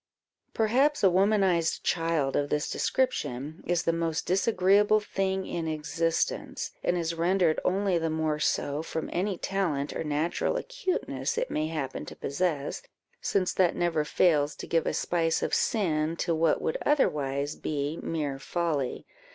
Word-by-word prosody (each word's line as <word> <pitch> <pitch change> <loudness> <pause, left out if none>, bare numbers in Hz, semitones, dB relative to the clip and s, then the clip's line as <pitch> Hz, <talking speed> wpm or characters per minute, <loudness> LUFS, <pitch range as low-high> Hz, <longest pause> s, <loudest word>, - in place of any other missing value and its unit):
Perhaps 260 +7 +2
a 190 - +6
womanized 190 -3 +2
child 165 -5 0
of 145 0 0
this 150 0 -1
description 150 - -1
is 175 -1 +1
the 165 - +1
most 165 -1 -1
disagreeable 200 +2 +3
thing 190 -2 -2
in 165 -1 -3
existence, 160 +1 -1
and 180 - +1
is 170 -1 -1
rendered 170 -1 +2
only 190 -1 +1
the 165 0 -1
more 155 -1 -1
so, 145 -1 0
from 160 0 -4
any 190 +1 -1
talent 170 -9 -1
or - - -2
natural 155 - 0
acuteness - - -2
it - - -1
may 155 - 0
happen 150 -5 -4
to - - -8
possess, 145 -1 -2 0.4
since 185 -2 0
that 180 -2 +2
never 165 -3 +1
fails 150 -2 +2
to - - -7
give 165 -1 +1
a - - 0
spice 165 -2 0
of - - -2
sin 165 -7 +1
to 170 0 -1
what 160 0 +2
would 160 - -1
otherwise 145 - +1
be 145 +1 -3
mere 145 -4 -3
folly. 155 -3 -2
165 Hz, 150 wpm, -28 LUFS, 155-190 Hz, 0.4 s, a